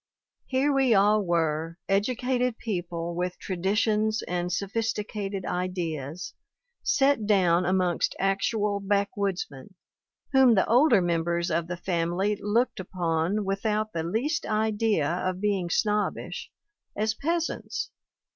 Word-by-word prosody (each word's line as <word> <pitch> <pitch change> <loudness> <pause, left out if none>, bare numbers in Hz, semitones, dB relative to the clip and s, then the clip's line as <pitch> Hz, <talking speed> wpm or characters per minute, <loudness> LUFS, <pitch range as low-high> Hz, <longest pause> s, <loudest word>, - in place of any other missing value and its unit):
Here 275 +2 +2
we 265 -4 +4
all 205 +2 +4
were, 165 -2 0
educated 245 +4 0
people 175 -5 -3
with 180 +1 -2
traditions 210 +4 0
and 180 0 -2
sophisticated 205 0 -2
ideas, 175 -4 -3 0.5
set 270 -6 +2
down 180 -4 +3
amongst 185 -2 +1
actual 200 +1 0
backwoodsmen, 200 - -2 0.6
whom 265 -4 +6
the 190 - +3
older 240 - +5
mem 170 -1 +1
bers 170 +1 -1
of 165 +1 0
the 180 0 -4
family 175 +3 0
looked 230 +3 +1
upon, 180 +2 -1
without 210 +2 -1
the 165 - -1
least 225 - -1
idea 215 -6 +1
of 185 +2 -2
being 195 -4 0
snobbish, 210 +3 -1 0.5
as 215 +1 0
peasants. 330 +7 -2
195 Hz, 115 wpm, -27 LUFS, 175-220 Hz, 0.6 s, whom